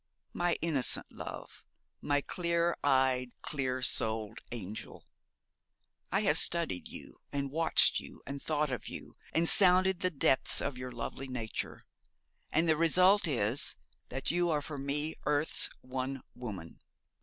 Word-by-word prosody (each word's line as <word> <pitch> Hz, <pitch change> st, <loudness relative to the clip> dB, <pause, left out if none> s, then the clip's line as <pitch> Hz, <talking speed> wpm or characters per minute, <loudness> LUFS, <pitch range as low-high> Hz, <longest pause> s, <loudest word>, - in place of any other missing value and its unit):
My 175 Hz, -1 st, +1 dB
innocent 150 Hz, -6 st, +1 dB
love, -, -, -9 dB, 0.4 s
my 145 Hz, -1 st, +1 dB
clear 170 Hz, +1 st, 0 dB
eyed, 130 Hz, -3 st, +2 dB
clear 130 Hz, -3 st, -2 dB
souled 110 Hz, -1 st, +2 dB
angel! 105 Hz, -3 st, -7 dB, 1.1 s
I 195 Hz, -, +2 dB
have 160 Hz, -7 st, +3 dB
studied 170 Hz, -, +2 dB
you -, -, -11 dB
and 140 Hz, -1 st, -2 dB
watched 165 Hz, +2 st, +3 dB
you -, -, -12 dB
and 140 Hz, 0 st, -6 dB
thought 150 Hz, -2 st, 0 dB
of 125 Hz, -, -4 dB
you, -, -, -8 dB, 0.2 s
and 165 Hz, +1 st, +2 dB
sounded 185 Hz, -1 st, +6 dB
the 185 Hz, -, +1 dB
depths 135 Hz, -5 st, +2 dB
of 140 Hz, -, -2 dB
your 125 Hz, 0 st, -6 dB
lovely 125 Hz, +3 st, -5 dB
nature, 120 Hz, -4 st, -5 dB, 0.7 s
and 165 Hz, +2 st, +3 dB
the 160 Hz, -, +4 dB
result 180 Hz, +5 st, +5 dB
is 120 Hz, -2 st, 0 dB, 0.3 s
that 130 Hz, +2 st, -1 dB
you 175 Hz, +1 st, +1 dB
are 150 Hz, -3 st, 0 dB
for 145 Hz, -2 st, -6 dB
me 145 Hz, +3 st, -2 dB
earth's 150 Hz, +1 st, +1 dB
one 130 Hz, +1 st, -4 dB
woman. 100 Hz, -9 st, -7 dB
140 Hz, 140 wpm, -32 LUFS, 125-165 Hz, 1.1 s, sounded